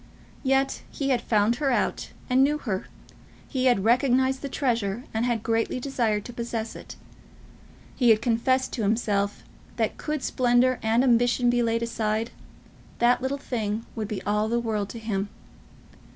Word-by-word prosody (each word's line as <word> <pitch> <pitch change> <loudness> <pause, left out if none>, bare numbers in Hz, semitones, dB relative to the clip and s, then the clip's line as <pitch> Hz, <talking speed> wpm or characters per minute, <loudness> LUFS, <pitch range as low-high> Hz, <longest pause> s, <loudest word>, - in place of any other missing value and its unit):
Yet 270 0 +1
he 275 -1 -3
had 250 -3 +2
found 220 +2 +2
her 280 0 0
out, 250 - 0 0.2
and 255 +1 +4
knew 295 +2 +2
her. 210 -10 -3 0.6
He 260 -1 -1
had 245 -7 +3
recognised 260 +3 +3
the 280 - -4
treasure, 235 -5 -1
and 225 +2 0
had 230 -3 -1
greatly 225 +2 0
desired 235 -6 -1
to 245 - -8
possess 230 -1 -4
it. - - -10 1.0
He 245 -3 +3
had 220 -1 +6
confessed 250 +3 +1
to 235 - -2
himself 205 -1 0 0.3
that, - - -1
could 300 -3 -3
splendour 250 0 +2
and 225 +3 +2
ambition 245 0 +3
be 240 0 +2
laid 230 0 0
aside, 225 -1 -1 0.7
that 245 +1 +3
little 265 +2 -1
thing 225 -5 -3
would 215 -2 -3
be 215 -2 -5
all 210 +2 0
the 235 +1 +1
world 215 -4 -2
to 230 - -7
him. 210 -3 -2
235 Hz, 165 wpm, -26 LUFS, 220-255 Hz, 1.0 s, had